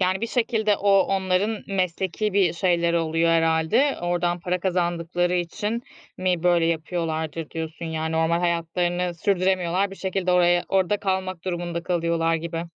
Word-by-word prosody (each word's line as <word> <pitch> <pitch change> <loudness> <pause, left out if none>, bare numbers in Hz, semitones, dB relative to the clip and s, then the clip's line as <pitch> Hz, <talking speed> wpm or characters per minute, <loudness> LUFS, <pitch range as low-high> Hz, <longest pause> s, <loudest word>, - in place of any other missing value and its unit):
Yani 185 +1 +1
bir 230 - -1
şekilde 225 -3 +1
o, 200 +1 +1
onların 195 +3 0
mesleki 190 +2 -1
bir 190 -4 +3
şeyleri 170 -1 +1
oluyor 165 +1 +1
herhâlde, 165 - +2
oradan 175 0 0
para 180 +1 -2
kazandıkları 175 -1 0
için 205 +6 -2 0.3
mi 180 -2 0
böyle 175 -2 +3
yapıyorlardır 160 -1 -2
diyorsun? 160 +1 -6
Yani 160 0 -3
normal 160 +1 +2
hayatlarını, 170 0 0
hayatlarını 180 -1 -1
sürdüremiyorlar, 185 +1 +1
bir 195 - -9
şekilde 190 -1 -1
oraya, 175 0 +3
orada 195 +1 +2
kalmak 185 -3 -2
durumunda 175 -2 -3
kalıyorlar 170 -2 0
gibi. 165 +1 -3
175 Hz, 145 wpm, -24 LUFS, 165-190 Hz, 0.3 s, bir